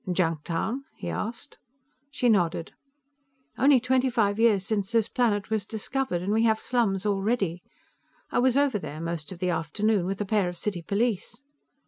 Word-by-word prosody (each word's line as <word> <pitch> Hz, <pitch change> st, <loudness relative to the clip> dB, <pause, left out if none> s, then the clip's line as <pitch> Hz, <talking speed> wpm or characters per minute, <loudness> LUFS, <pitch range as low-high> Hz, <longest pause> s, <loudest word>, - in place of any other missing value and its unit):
"Junktown?" 170 Hz, -, -1 dB
he -, -, -6 dB
asked. 235 Hz, +6 st, -5 dB, 0.5 s
She 265 Hz, -3 st, 0 dB
nodded. 175 Hz, -7 st, +1 dB, 0.8 s
"Only 270 Hz, -1 st, +5 dB
twenty 255 Hz, +1 st, +2 dB
five 215 Hz, -3 st, +1 dB
years 215 Hz, -5 st, +4 dB
since 205 Hz, -2 st, -1 dB
this 230 Hz, -2 st, +2 dB
planet 220 Hz, -5 st, 0 dB
was 215 Hz, -2 st, +1 dB
discovered, 220 Hz, -2 st, -3 dB
and 200 Hz, +3 st, 0 dB
we 220 Hz, -, +3 dB
have 220 Hz, -1 st, +3 dB
slums 215 Hz, -6 st, 0 dB
already. 195 Hz, -3 st, 0 dB, 0.7 s
I -, -, +2 dB
was 255 Hz, +1 st, +3 dB
over 280 Hz, -7 st, +2 dB
there 155 Hz, -4 st, -7 dB
most 165 Hz, -1 st, -4 dB
of 185 Hz, -, -7 dB
the 180 Hz, 0 st, 0 dB
afternoon, 180 Hz, +4 st, 0 dB
with 195 Hz, 0 st, -3 dB
a 205 Hz, -, -1 dB
pair 200 Hz, -3 st, +1 dB
of 175 Hz, -, -7 dB
city 185 Hz, -1 st, -3 dB
police." 225 Hz, -, -2 dB
210 Hz, 165 wpm, -27 LUFS, 180-235 Hz, 0.8 s, Only